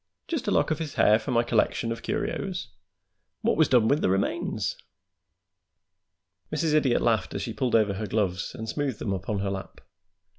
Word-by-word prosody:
"Just 300 -7 -3
a - - +2
lock - - +2
of 155 - 0
his 155 -4 -5
hair 105 +1 +5
for 110 - -7
my 120 -2 +3
collection 115 0 +1
of 115 - -4
curios? 195 -3 -3 0.7
What - - +2
was 160 -1 +4
done 120 -4 +5
with 145 +5 +2
the - - +2
remains?" 95 +1 -1 1.8
Mrs. 155 0 0
Idiot 140 -5 +3
laughed 110 -6 +1
as - - -2
she - - -4
pulled 125 -3 0
over 105 -3 +3
her 105 +2 -4
gloves 95 -3 -1
and 110 -2 -6
smoothed 135 -1 -2
them 100 - -2
upon 95 +1 -2
her 100 -1 -1
lap. 95 0 -6
115 Hz, 185 wpm, -27 LUFS, 105-150 Hz, 1.8 s, hair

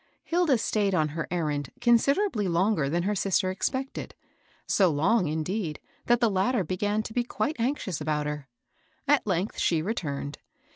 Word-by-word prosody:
Hilda 335 -6 +2
stayed 205 -3 +1
on 155 -3 +2
her 160 +2 -4
errand 150 -6 -1
considerably 240 - +3
longer 175 -4 +1
than 170 +3 0
her 205 +3 +1
sister 190 -1 +1
expected, 260 +8 -3 0.3
— - - -35
so 190 -3 +4
long, 175 +6 +2
indeed, 160 +2 -2 0.3
that 240 0 +4
the 235 -3 +3
latter 195 +3 +1
began 205 +5 -1
to 220 - -7
be 245 - +1
quite 290 +5 -2
anxious 230 - -1
about 150 -1 -1
her. 150 -2 -5 0.6
At 290 -6 +3
length, 190 +2 -1
she 160 -2 +2
returned. 145 -8 -3
190 Hz, 160 wpm, -27 LUFS, 155-230 Hz, 0.6 s, so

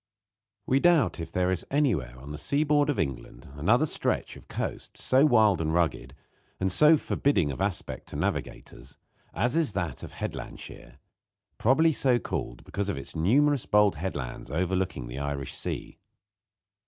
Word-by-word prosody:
We 135 - +2
doubt 150 - +3
if 80 0 -6
there 90 +1 +1
is 95 - -1
anywhere 95 - 0
on 70 +3 -10
the 75 - -6
sea 140 - +1
board 145 -1 +2
of 145 - 0
England 70 -5 -4
another 110 - +2
stretch - - -2
of - - -15
coast - - -5
so 135 +4 +4
wild 110 - +4
and 80 -1 -1
rugged, 70 -6 -1 0.4
and 95 0 0
so 155 - +6
forbidding 95 - +1
of 70 - -6
aspect 100 -2 -3
to - - -10
navigators, - - -4 0.3
as 120 - 0
is 160 -10 +2
that 85 -2 -3
of - - -9
Headlandshire - - -7 0.6
probably 155 +8 +4
so 130 -3 +2
called - - -5
because 100 0 -3
of 100 - -2
its 70 - -7
numerous 135 - +2
bold 105 -1 +4
headlands 75 -8 -5
overlooking 90 -4 -1
the - - -7
Irish 70 -2 -4
Sea. - - -5
95 Hz, 160 wpm, -27 LUFS, -, 0.6 s, so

